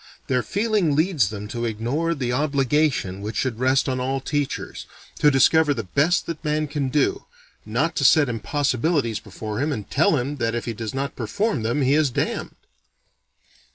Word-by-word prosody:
Their 125 -1 +1
feeling 205 - 0
leads 155 - +2
them 105 -1 -6
to 120 +1 -3
ignore 120 +10 -1
the 125 -4 -2
obligation 140 -7 +1
which 105 +2 -5
should 125 -4 -1
rest 130 +2 +2
on 130 -1 -1
all 135 +2 -1
teachers, 145 +1 -3 0.3
"to 150 - +6
discover 145 +2 +4
the 115 - -3
best 145 - +1
that 165 -1 -6
man 155 0 0
can 145 -2 -2
do, 145 +1 0 0.4
not 145 +10 0
to - - +1
set 145 +2 +6
impossibilities 130 - 0
before 105 +1 -6
him 150 +3 0
and 105 -8 -4
tell 155 +1 +3
him 140 +3 -3
that 115 -2 -1
if 120 - -3
he 115 - -3
does 110 +1 -5
not 140 +1 -3
perform 140 - -1
them 120 +6 0
he 130 +2 +3
is 150 -1 +3
damned." 120 - -3
135 Hz, 180 wpm, -23 LUFS, 115-150 Hz, 0.4 s, to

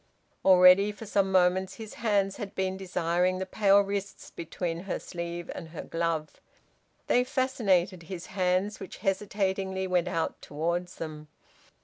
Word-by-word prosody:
Already 185 +2 +7
for 210 +2 -10
some 195 -2 +1
moments 185 +1 +2
his 220 -2 -9
hands 200 -4 0
had 205 -4 -6
been 190 0 -1
desiring 180 -1 0
the 190 - -3
pale 200 +1 +4
wrists 200 0 -5
between 165 0 -4
her 195 - -2
sleeve 170 -1 -6
and 165 - -7
her 160 - -7
glove. 165 -2 -2 0.6
They 245 - +3
fascinated 220 -9 +1
his 185 -2 -6
hands, 185 +2 0
which, 190 - -8
hesitatingly, 190 -1 -1
went 180 -1 +1
out 165 -2 -2
towards 170 +4 -3
them. 155 -1 -7
185 Hz, 140 wpm, -28 LUFS, 175-200 Hz, 0.6 s, Already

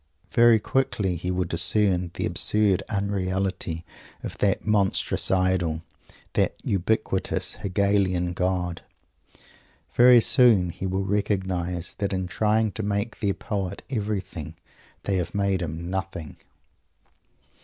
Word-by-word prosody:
Very 120 -1 +6
quickly 105 -6 0
he 90 +2 -4
will 90 0 0
discern 90 +1 +1
the - - -2
absurd 105 -3 +2
unreality 95 -4 -2 0.4
of - - -5
that 100 -2 +1
monstrous 105 -3 +1
Idol, 90 -4 +1 0.5
that - - +1
ubiquitous 95 0 -1
Hegelian 95 -2 +1
God. 90 -1 -1 1.1
Very 125 0 +7
soon 110 -8 +5
he 95 - -5
will 95 +1 -1
recognize 95 -3 -1
that 100 -1 -1
in 95 -1 -1
trying 110 +3 +1
to 110 - -5
make 100 +2 -2
their 100 -2 0
poet 100 -3 -4
everything 100 - -4 0.5
they 100 -2 0
have 90 +2 -3
made 100 -2 +1
him 85 0 -4
nothing. 90 -4 -5
95 Hz, 115 wpm, -25 LUFS, 90-105 Hz, 1.1 s, Very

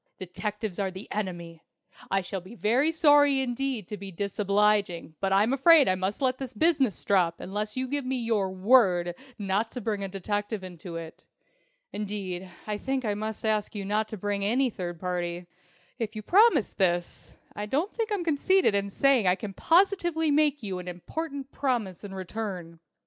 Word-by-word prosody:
Detectives 205 +2 -5
are 195 -1 0
the 190 +2 -9
Enemy! 175 -5 -4 0.5
I 195 0 +2
shall 190 +1 -5
be 185 +7 -12
very 245 +9 +2
sorry 290 -4 +5
indeed 255 -4 -2
to 210 - -5
be 195 0 -8
disobliging, 200 -2 +1
but 195 -1 -1
I'm 205 +6 +3
afraid 295 +2 +6
I 185 - +4
must 190 +7 -2
let 255 0 +1
this 260 -2 -6
business 275 - +2
drop 175 -4 +2
unless 210 +4 -4
you 260 0 -1
give 285 +2 -2
me 260 +1 -1
your 225 -5 0
word 185 -4 +4 0.2
not 205 +2 0
to 250 - -4
bring 210 -3 -2
a - - -2
detective 205 +2 -3
into 175 -1 -8
it. 165 -1 -8 0.7
Indeed, 195 -3 -4 0.2
I 210 -1 -3
think 265 0 -2
I 210 - +1
must 215 +1 -4
ask 215 -1 0
you 200 -1 -4
not 210 +2 0
to 215 - -7
bring 205 +1 -2
in 200 +2 +1
any 260 0 +2
third 175 -4 -6
party. 175 -1 -3 0.5
If 225 -1 -3
you 215 - -5
promise 370 - +4
this, 175 -3 -1 0.2
I 210 0 -4
don't 305 - -1
think 455 -1 -2
I'm 400 -4 0
conceited 335 - +3
in 200 0 0
saying 255 -1 +3
I 180 - +5
can 200 0 -7
positively 345 - +2
make 290 -3 +2
you 190 -3 -3
an 180 - -8
important 275 - -5
promise 235 -10 -2
in 195 -1 -7
return. 185 -4 -5
210 Hz, 180 wpm, -27 LUFS, 190-265 Hz, 0.7 s, afraid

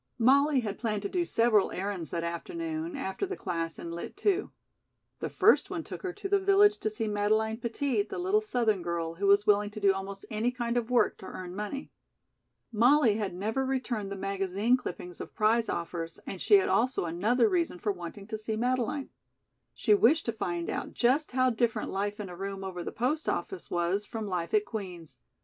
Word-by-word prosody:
Molly 275 +3 +4
had 210 -3 -4
planned 215 -3 -1
to 200 - -2
do 355 - 0
several 230 - +3
errands 185 -5 -3
that 170 - -2
afternoon, 320 - -4
after 275 - -3
the 385 - -5
class 165 -3 -3
in 170 - -6
Lit. 170 - -7
II. 400 -1 +2 0.7
The - - -3
first - - +4
one - - -3
took - - -8
her 375 - -3
to 400 +2 -6
the 400 0 +3
village 400 +2 +5
to 215 - -1
see 215 +1 -3
Madeleine 215 +2 +1
Petit, 235 0 0
the 205 - -5
little 380 +4 +2
Southern 235 - +1
girl, 170 -1 -2
who 195 +4 -1
was 200 +1 +5
willing 205 0 +3
to 210 +1 -8
do 200 -1 +4
almost 195 0 -6
any 220 +3 +1
kind 240 -1 -2
of 240 -1 0
work 250 -1 +2
to 190 - -9
earn 180 -1 -7
money. 210 +7 -5 0.8
Molly 240 0 +4
had 200 -5 -3
never 220 +8 -1
returned 250 -6 -2
the - - -3
magazine 195 +4 +1
clippings 180 -7 -6
of - - -9
prize 225 +1 +2
offers, 165 -1 -4
and 190 - -6
she 415 - +6
had 390 - +4
also 255 -4 +1
another 215 +9 +2
reason 340 - 0
for 205 - -1
wanting 185 +2 -8
to 220 +1 -5
see 215 0 -3
Madeleine. 250 +4 -1 0.6
She 215 - +3
wished 260 +10 +4
to 230 - 0
find 175 -6 -3
out - - -4
just 260 +4 +2
how 255 0 +3
different 235 0 0
life 205 +2 -2
in 205 - -4
a 180 - -8
room 195 +1 -5
over 180 -2 -5
the - - -4
post 270 +8 -1
office 385 - -3
was 175 +4 0
from 220 0 -5
life 180 -4 -2
at 210 0 +3
Queen's. 175 - -7
215 Hz, 205 wpm, -29 LUFS, 195-255 Hz, 0.8 s, she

